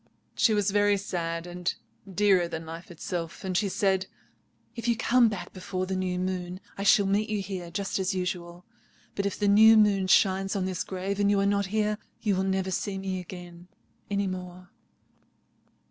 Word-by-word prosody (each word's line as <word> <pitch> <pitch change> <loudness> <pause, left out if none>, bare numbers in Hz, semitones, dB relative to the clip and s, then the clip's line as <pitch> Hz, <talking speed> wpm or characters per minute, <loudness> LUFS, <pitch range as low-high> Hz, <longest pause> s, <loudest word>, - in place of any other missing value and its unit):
She 220 - +3
was 205 -1 +1
very 205 0 +3
sad, 170 -3 -3
and 175 0 -2 0.4
dearer 190 -2 +3
than 160 -1 -6
life 165 +2 -9
itself. 170 -1 -5
And 185 -1 -3
she 200 +2 +1
said— 190 0 +1 0.7
"'If 235 0 -5
you 235 -1 +2
come 240 0 +4
back 180 -4 -6
before 185 0 -4
the 190 0 -3
new 185 -1 -1
moon 180 0 -3 0.2
I - - -6
shall 200 0 +5
meet 205 +2 +1
you 210 -1 -1
here 190 -3 -5
just 195 +3 -2
as 190 +1 0
usual. 180 -1 -4 0.5
But 200 0 -1
if 200 - -4
the 205 - +1
new 220 +2 +7
moon 200 -3 +4
shines 195 +1 +3
on 190 -2 0
this 185 -2 -2
grave 195 +1 -4
and 200 0 +3
you 205 -1 +3
are 195 - +2
not 200 0 +1
here—you 210 0 -1
will 185 - 0
never 190 0 -1
see 195 +2 -2
me 190 -1 -3
again 175 -1 -10 0.4
any 200 0 0
more.' 180 -1 -7
190 Hz, 185 wpm, -27 LUFS, 180-200 Hz, 0.7 s, new